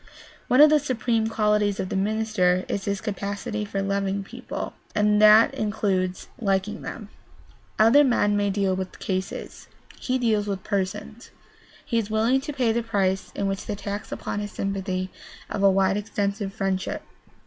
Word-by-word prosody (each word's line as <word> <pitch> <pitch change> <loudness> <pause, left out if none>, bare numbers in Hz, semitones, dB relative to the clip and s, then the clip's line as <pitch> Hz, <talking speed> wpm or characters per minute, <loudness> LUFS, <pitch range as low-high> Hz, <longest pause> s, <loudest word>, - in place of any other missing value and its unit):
One 255 +3 +5
of 300 0 +8
the 305 - +5
supreme 235 -5 0
qualities 210 -2 +1
of 185 - -2
the - - -3
minister 195 -3 +1
is 195 - -3
his 200 -1 -2
capacity 205 +1 -3
for 195 -1 -3
loving 195 0 -1
people, - - -6 0.2
and 210 0 +3
that 215 +1 +7
includes 195 -4 -1
liking 200 0 -1
them. 210 -3 -7 0.7
Other 230 +7 +6
men 220 -6 +2
may 205 0 +1
deal 195 -1 +1
with 185 0 -5
cases; 190 -1 -4 0.3
he 255 0 0
deals 220 -4 +1
with 195 -2 -3
persons. 200 +3 -3 0.6
He 230 - +1
is 215 -2 -3
willing 225 +5 +2
to 295 +2 -5
pay 255 -5 +1
the 235 +1 0
price 195 -4 -1
in 200 - -1
the 195 - 0 0.2
tax 200 +1 -5
upon - - -4
his 205 -1 -5
sympathy 190 -1 -3 0.4
of 200 - -2
a 200 - +6
wide 195 0 +2
extended 205 -1 -2
friendship. 195 -3 -2
205 Hz, 160 wpm, -25 LUFS, 195-220 Hz, 0.7 s, of